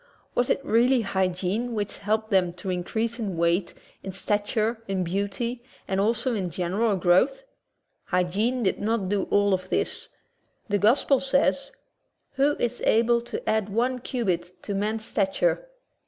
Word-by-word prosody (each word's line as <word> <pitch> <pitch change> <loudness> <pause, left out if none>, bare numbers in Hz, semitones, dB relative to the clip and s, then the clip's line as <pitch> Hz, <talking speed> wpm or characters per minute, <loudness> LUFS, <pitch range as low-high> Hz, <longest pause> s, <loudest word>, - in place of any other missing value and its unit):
Was 245 - +1
it 275 - 0
really 240 +3 +4
hygiene 190 +4 -1
which 205 -1 -3
helped 220 +2 -1
them 180 -3 +3
to 180 +2 -5
increase 220 +6 -2
in 200 -6 -3
weight, 170 +2 +1 0.3
in 190 - -6
stature, 215 +4 -1
in 190 -1 -1
beauty, 200 +7 -2 0.3
and 195 0 0
also 230 +4 +1
in 190 -5 -2
general 190 +6 0
growth? 185 - +3 0.6
Hy 180 0 +2
giene 220 +8 0
did 190 - +1
not 210 -3 0
do 205 -1 0
all 205 -1 +3
of 185 0 -2
this. - - -2 0.6
The 205 -1 +1
gospels 265 +5 +3
say: 275 +1 +4 0.8
"Who 285 +2 +2
is 240 0 -2
able 235 +1 +3
to 240 - -6
add 215 -2 +1
one 245 +5 0
cubit 180 -8 -3
to 205 - -3
man's 215 +2 -2
stat 195 -3 -1
ure?'' - - +1
210 Hz, 155 wpm, -26 LUFS, 190-235 Hz, 0.8 s, really